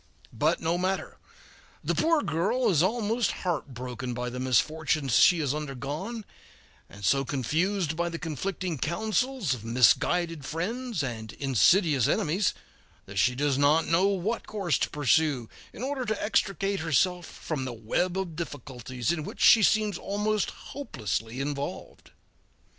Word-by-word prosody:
But 150 +8 +1
no 165 +2 0
matter, 190 +1 -2 0.6
the - - 0
poor 325 -2 +2
girl 190 +11 +1
is 160 -4 +3
almost 225 +3 +1
heartbroken 125 -7 -4
by 125 0 -3
the 125 - -5
misfortunes 140 +1 +1
she 175 - +6
has 140 -3 0
undergone, 150 - -5 0.6
and 100 -1 -8
so 135 +5 +3
confused 160 - -1
by 170 +1 -1
the 170 - -5
conflicting 170 0 -3
counsels 220 - 0
of 120 -4 -7
misguided 145 +7 +2
friends 215 - -3
and 110 -4 -5
insidious 135 - +3
enemies 180 +6 +1 0.5
that 100 0 -4
she 125 +7 +3
does 140 0 +1
not 150 +3 +4
know 170 +4 +3
what 200 +4 -1
course 195 -7 0
to - - 0
pursue 145 -3 +2 0.2
in 235 - -8
order 270 -1 -2
to 220 -3 -2
extricate 195 -2 0
herself 170 +3 +1
from 145 -5 -5
the 130 - -4
web 145 - -1
of 185 -4 -3
difficulties 130 -4 -4
in 165 -3 -2
which - - -8
she 225 - +8
seems 215 0 +2
almost 210 +1 -1 0.2
hopelessly 115 - -4
involved. 140 0 -5
160 Hz, 140 wpm, -27 LUFS, 130-195 Hz, 0.6 s, she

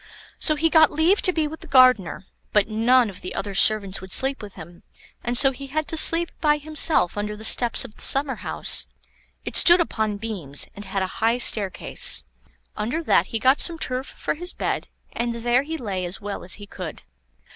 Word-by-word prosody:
So 310 - +1
he 320 +2 0
got 315 -2 +5
leave 325 +7 +1
to 365 - +4
be 320 -3 -2
with 315 +2 -10
the - - -13
gardener, 250 - +3 0.3
but 210 -1 +2
none 235 +3 +2
of 195 -3 -10
the 185 - -8
other 200 0 -5
servants 200 -1 +2
would 190 0 -12
sleep 270 +5 0
with 205 -2 -11
him, 170 +2 -13 0.4
and 240 0 0
so 270 +1 +5
he 275 +1 -10
had 310 +3 -4
to - - -2
sleep 335 +2 +3
by 300 -1 +2
himself 295 - +1
under 210 0 -5
the 215 - -11
steps 240 +3 +3
of 225 - -12
the - - -15
summer 275 0 +2
house. - - +2 0.6
It - - -6
stood 345 +1 +7
upon 220 -10 -2
beams, 195 -11 -5
and 205 - -10
had 195 0 -3
a 185 - -8
high 230 +2 +1
staircase. 205 -6 +2 0.5
Under 240 +11 -4
that - - +2
he 225 - -4
got 260 +5 +2
some 335 -1 -2
turf 255 -3 -4
for - - -5
his 355 +3 -5
bed, - - -4 0.2
and 235 0 -4
there 240 +2 0
he 320 +3 -6
lay 200 -9 -5
as 175 +2 -5
well 205 -1 -7
as 180 - 0
he 205 - -12
could. - - -9
240 Hz, 210 wpm, -22 LUFS, 205-295 Hz, 0.6 s, stood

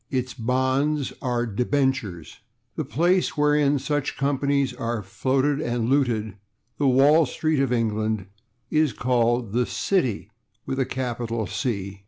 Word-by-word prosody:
Its 130 -2 -2
bonds 130 +4 0
are 120 -2 0
/debentures/. 120 - -1 0.4
The - - -2
place 175 +7 +1
wherein 150 -1 +3
such 145 +1 -2
companies 140 -1 +1
are 115 -3 -3
floated 135 +8 0
and 120 -2 -1
looted 115 -7 +1 0.4
the 145 - +2
Wall 140 +4 +5
Street 155 +2 0
of 135 -2 +1
England 110 -3 0 0.5
is 155 -3 +2
called 120 -2 +1
the 125 +1 +2
/City/, 125 - -1 0.4
with 135 - -3
a 135 - +2
capital 120 -3 -3
/C 100 -7 -3
130 Hz, 130 wpm, -24 LUFS, 115-140 Hz, 0.5 s, Wall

